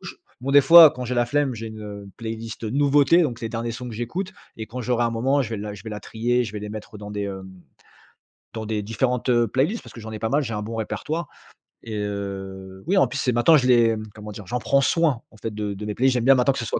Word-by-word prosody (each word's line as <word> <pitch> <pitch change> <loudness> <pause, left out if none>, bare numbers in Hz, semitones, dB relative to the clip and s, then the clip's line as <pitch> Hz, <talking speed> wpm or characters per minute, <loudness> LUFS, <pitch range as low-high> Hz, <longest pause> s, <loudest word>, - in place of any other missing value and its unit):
gauche. - - -9 0.2
Bon, 135 +2 -3
des 145 +1 +8
fois, 165 +2 +10
quand 125 -1 -6
j'ai 125 +1 -3
la 120 0 +3
flemme, 140 +1 0
j'ai 115 0 -6
une, 110 0 -9
heu, 100 -1 -7
une 100 - -12
playlist, 115 0 -6
heu, 110 - -3
nouveautés, 145 +4 +4
donc, 125 -7 -2
les 115 - -3
derniers 115 +1 -3
sons 125 +2 -6
que 115 - -7
j'écoute. 175 - -4 0.2
Et 110 - -6
quand 125 +3 -6
j'aurai 120 0 0
un 115 - +1
moment, 130 +5 +1
je 120 -5 -2
vais 110 - -2
la 105 0 -5
je 100 - -12
vais 110 - -6
la 105 0 -6
trier. 120 +2 0
Je 110 - -5
vais 105 - -4
les 105 0 -6
mettre 105 0 -8
dans 105 0 -8
des, 105 0 -3
hem 95 -1 -6 1.1
dans 110 -1 -5
des 105 -1 -2
différentes, 125 +4 -1
heu, 120 -1 +3
playlists. 145 - 0
Parce - - -13
que 115 - -10
j'en 110 0 -8
ai 110 - -5
pas 110 - -1
mal. 145 +4 +2
J'ai 115 - -4
un 105 - -3
bon 115 +2 -6
répertoire. 155 +9 -3 0.6
Et, 110 -2 -5
heu, 95 -2 -5
oui, 195 - +2
en - - +5
plus, 140 - -5
c'est 125 -3 0
maintenant, 150 +7 +5
je 125 -2 +1
les, 115 -2 +5 0.2
comment 105 -1 -8
dire? 100 -2 -10
J'en 125 +4 -2
prends 140 - +2
soin, 150 -3 +2
en 110 - -18
fait, 110 0 -5
de 105 -1 -3
de 105 +2 -7
mes 105 - -4
playlists. 130 +1 +3
J'aime 125 -2 0
bien 135 +1 +7
maintenant 130 +2 +3
que - - -5
ce - - -3
soit - - -2
115 Hz, 290 wpm, -23 LUFS, 105-130 Hz, 1.1 s, fois